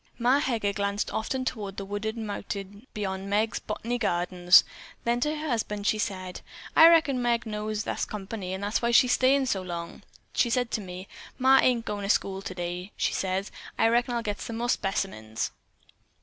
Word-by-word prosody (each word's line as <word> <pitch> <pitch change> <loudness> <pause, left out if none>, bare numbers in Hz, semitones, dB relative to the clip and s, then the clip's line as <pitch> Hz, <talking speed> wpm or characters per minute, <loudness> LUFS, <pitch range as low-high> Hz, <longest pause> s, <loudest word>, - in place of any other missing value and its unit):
Ma 250 +4 +3
Heger 225 -7 0
glanced 200 0 -1
often 255 +4 -2
toward 205 -6 -4
the 195 - -4
wooded 210 +3 -3
mountain 205 0 -6
beyond 195 -2 -4
Meg's 215 +3 +1
"Bot'ny 235 +3 -3
Gardens." 180 -3 +4 0.4
Then 235 +1 +1
to 300 +5 0
her 310 +1 -4
husband 210 -4 -2
she 215 - +2
said: 185 -4 -4 0.3
"I 325 - +10
reckon 300 -6 +4
Meg 240 0 +1
knows 215 0 -3
thar's - - -2
company, 195 -2 -6
an' 190 - -6
that's 205 +2 0
why 235 - +1
she's 245 +1 +5
stayin' 265 +2 +4
so 200 -7 0
long. 170 -2 -6 0.3
She 240 - +2
said 245 -1 0
to 215 - -1
me, 185 0 -8 0.3
'Ma, 265 +1 +6
I - - +4
ain't 240 -3 +2
agoin' 205 -1 -3
to 200 - -4
school 195 -2 +1
today,' 180 0 -5
says 190 +1 -1
she. - - -14 0.2
'I - - +4
reckon 240 +1 +1
I'll 235 - -1
get 205 -2 -3
some 230 - -5
more 240 +1 -2
specimens.'" 190 - -2
210 Hz, 190 wpm, -27 LUFS, 195-240 Hz, 0.4 s, I